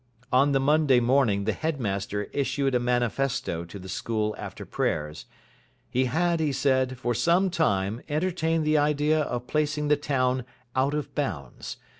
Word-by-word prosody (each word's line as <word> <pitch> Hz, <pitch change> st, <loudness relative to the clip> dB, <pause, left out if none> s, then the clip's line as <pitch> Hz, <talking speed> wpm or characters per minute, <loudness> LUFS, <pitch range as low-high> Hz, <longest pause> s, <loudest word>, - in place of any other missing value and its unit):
On 140 Hz, +3 st, +5 dB
the 135 Hz, -, +3 dB
Monday 145 Hz, -2 st, +4 dB
morning 120 Hz, -5 st, +2 dB
the -, -, 0 dB
headmaster 105 Hz, -10 st, -2 dB
issued 140 Hz, -1 st, 0 dB
a 125 Hz, -, +3 dB
manifesto 120 Hz, -6 st, 0 dB
to 85 Hz, -, -9 dB
the 95 Hz, -1 st, -10 dB
school 105 Hz, +2 st, -2 dB
after -, -, -7 dB
prayers. 75 Hz, -1 st, -2 dB, 0.7 s
He 130 Hz, +1 st, +2 dB
had, 170 Hz, +6 st, +1 dB
he 155 Hz, -2 st, +1 dB
said, 130 Hz, -2 st, +1 dB
for 120 Hz, -1 st, -1 dB
some 170 Hz, -, +2 dB
time 105 Hz, -, 0 dB
entertained 165 Hz, 0 st, 0 dB
the 155 Hz, 0 st, +3 dB
idea 150 Hz, +1 st, +2 dB
of 125 Hz, -4 st, -3 dB
placing 150 Hz, +1 st, 0 dB
the 150 Hz, -, +4 dB
town 130 Hz, -3 st, 0 dB, 0.3 s
out 135 Hz, +3 st, +2 dB
of 145 Hz, -2 st, -4 dB
bounds. 70 Hz, -, -4 dB
135 Hz, 155 wpm, -26 LUFS, 120-150 Hz, 0.7 s, On